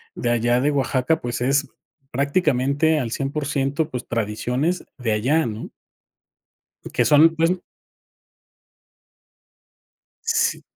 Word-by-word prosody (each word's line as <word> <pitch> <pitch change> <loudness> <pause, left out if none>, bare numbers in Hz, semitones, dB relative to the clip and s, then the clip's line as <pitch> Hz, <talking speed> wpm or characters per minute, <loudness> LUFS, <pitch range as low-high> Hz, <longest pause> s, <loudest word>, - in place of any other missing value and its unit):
de 120 - -2
allá 120 +1 +2
de 145 +3 +2
Oaxaca, 135 +3 +1
pues, 120 0 -3
es 140 +3 +1 0.4
prácticamente 140 +1 +1
al 115 -4 -3
100%, 140 +1 -1
pues, 125 - -5
tradiciones 125 - -1
de 125 -5 -2
allá, 135 +10 +2
¿no? 110 -1 -5 1.2
Que - - +2
son, 155 +2 +6
pues 165 +1 +3 2.7
S 460 -1 +1
140 Hz, 100 wpm, -22 LUFS, 120-155 Hz, 2.7 s, son